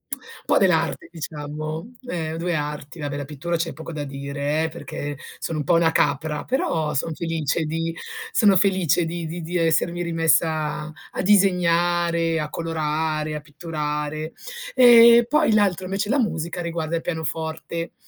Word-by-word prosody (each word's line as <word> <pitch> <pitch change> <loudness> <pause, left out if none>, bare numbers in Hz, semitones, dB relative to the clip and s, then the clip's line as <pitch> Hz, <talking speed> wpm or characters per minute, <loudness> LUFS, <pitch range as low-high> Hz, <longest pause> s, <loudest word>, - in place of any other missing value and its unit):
Un - - -16
po' - - +3
dell'arte 165 -4 +2
diciamo, 155 +4 -6
ehm, 160 -5 -3
2 175 +1 -1
arti, 150 +1 -5
vabbè 145 -1 -3
la 145 - -4
pittura 155 +5 -3
c'è 165 0 -2
poco 160 +3 -8
da 150 -2 -4
dire 140 +2 -2
eh, - - -2
perché 145 -3 -6 0.2
sono 165 - -3
un - - -1
po' 170 - +2
una 165 -1 +4
capra, 150 -1 0
però 160 - 0
son 155 +4 -1
felice 165 -1 -1
di 165 +1 -2 0.4
sono 205 -4 +5
felice 185 -3 +3
di 170 0 -4
di 170 +2 -5
di 170 +2 -3
essermi 170 +1 +1
rimessa 155 -2 +1 0.2
a - - -3
disegnare, 175 -4 +3
a 150 -1 -3
colorare, 155 -1 -2
a 150 - -4
pitturare. 150 0 -4 0.4
Ehm, 235 -2 +8
poi 300 -1 +3
l'altro 195 -4 +2
invece 195 +3 -2
la 280 - +2
musica, 175 -6 -1
riguarda 170 -1 -2
il - - -4
pianoforte, 160 0 -4
165 Hz, 155 wpm, -23 LUFS, 155-175 Hz, 0.4 s, Ehm